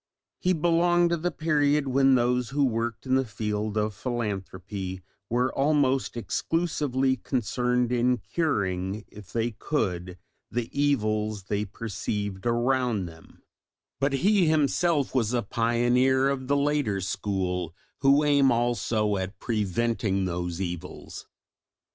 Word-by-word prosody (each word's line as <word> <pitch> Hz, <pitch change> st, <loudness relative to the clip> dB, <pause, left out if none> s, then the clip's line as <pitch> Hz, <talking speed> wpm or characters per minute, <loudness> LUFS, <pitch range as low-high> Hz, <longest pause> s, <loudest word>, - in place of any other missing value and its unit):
He 185 Hz, -, +2 dB
belonged 175 Hz, +1 st, +3 dB
to 170 Hz, -, +2 dB
the 175 Hz, +2 st, -1 dB
period 150 Hz, -3 st, +1 dB
when 135 Hz, 0 st, +4 dB
those 125 Hz, 0 st, +1 dB
who 140 Hz, 0 st, +2 dB
worked 115 Hz, -1 st, -2 dB
in 130 Hz, -, 0 dB
the 135 Hz, 0 st, +4 dB
field 105 Hz, -2 st, -3 dB
of 105 Hz, 0 st, 0 dB
philanthropy 95 Hz, -4 st, -4 dB, 0.3 s
were 125 Hz, +2 st, +1 dB
almost 135 Hz, -3 st, +1 dB
exclusively 135 Hz, -2 st, 0 dB
concerned 125 Hz, 0 st, 0 dB
in 125 Hz, +1 st, +2 dB
curing, 100 Hz, -, -2 dB
if 100 Hz, -3 st, -13 dB
they 115 Hz, +2 st, 0 dB
could, 90 Hz, -, -2 dB, 0.3 s
the 115 Hz, 0 st, -3 dB
evils 110 Hz, -7 st, 0 dB
they 105 Hz, +2 st, -2 dB
perceived 100 Hz, -1 st, -4 dB
around 120 Hz, -3 st, +1 dB
them; 80 Hz, -1 st, -14 dB, 0.6 s
but 140 Hz, 0 st, +1 dB
he 190 Hz, +5 st, +3 dB
himself 155 Hz, -1 st, +2 dB
was 120 Hz, -3 st, +1 dB
a 120 Hz, -, +1 dB
pioneer 120 Hz, +5 st, +2 dB
of 130 Hz, -2 st, -3 dB
the 140 Hz, +1 st, +2 dB
later 140 Hz, -8 st, +1 dB
school 95 Hz, -3 st, -2 dB, 0.2 s
who 140 Hz, +2 st, +4 dB
aim 140 Hz, -3 st, +4 dB
also 115 Hz, -3 st, +1 dB
at 95 Hz, +2 st, -4 dB
preventing 105 Hz, -1 st, 0 dB
those 90 Hz, -1 st, -3 dB
evils. 90 Hz, -3 st, -6 dB
120 Hz, 125 wpm, -27 LUFS, 100-140 Hz, 0.6 s, when